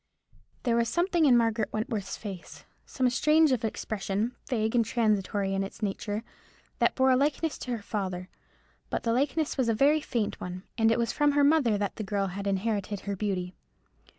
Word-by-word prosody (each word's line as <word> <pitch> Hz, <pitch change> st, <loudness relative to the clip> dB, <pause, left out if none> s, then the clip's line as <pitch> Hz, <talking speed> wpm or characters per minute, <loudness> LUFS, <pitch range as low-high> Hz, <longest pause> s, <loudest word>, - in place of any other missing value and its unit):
There 235 Hz, -2 st, +2 dB
was 235 Hz, 0 st, +2 dB
something 345 Hz, -2 st, +2 dB
in 250 Hz, -4 st, +6 dB
Margaret 225 Hz, -1 st, +1 dB
Wentworth's 215 Hz, -3 st, -3 dB
face, 195 Hz, -5 st, -9 dB, 0.2 s
some 260 Hz, -1 st, 0 dB
shade 305 Hz, +4 st, +4 dB
of 250 Hz, -3 st, 0 dB
expression, 215 Hz, +1 st, -2 dB
vague 220 Hz, -3 st, 0 dB
and 240 Hz, -2 st, +4 dB
transitory 205 Hz, -3 st, 0 dB
in 195 Hz, 0 st, 0 dB
its 195 Hz, +3 st, -8 dB
nature, 205 Hz, +2 st, -2 dB, 0.6 s
that -, -, +3 dB
bore 260 Hz, 0 st, +4 dB
a -, -, +5 dB
likeness 295 Hz, +4 st, 0 dB
to 250 Hz, -, -5 dB
her 210 Hz, -, -12 dB
father; 185 Hz, -4 st, -3 dB, 0.6 s
but -, -, -2 dB
the 230 Hz, -, +1 dB
likeness 290 Hz, +5 st, 0 dB
was 245 Hz, -3 st, +2 dB
a 225 Hz, -, +2 dB
very 290 Hz, +6 st, +4 dB
faint 230 Hz, -7 st, -2 dB
one, 180 Hz, +1 st, -6 dB
and 225 Hz, -1 st, +3 dB
it -, -, +2 dB
was 235 Hz, -1 st, 0 dB
from 295 Hz, -1 st, +3 dB
her 290 Hz, 0 st, +4 dB
mother 280 Hz, -8 st, +4 dB
that 200 Hz, -1 st, -3 dB
the 215 Hz, -, -3 dB
girl 200 Hz, -1 st, -1 dB
had 200 Hz, +1 st, -4 dB
inherited 200 Hz, 0 st, -1 dB
her 200 Hz, -1 st, -3 dB
beauty. 185 Hz, -3 st, -2 dB
225 Hz, 190 wpm, -28 LUFS, 200-260 Hz, 0.6 s, in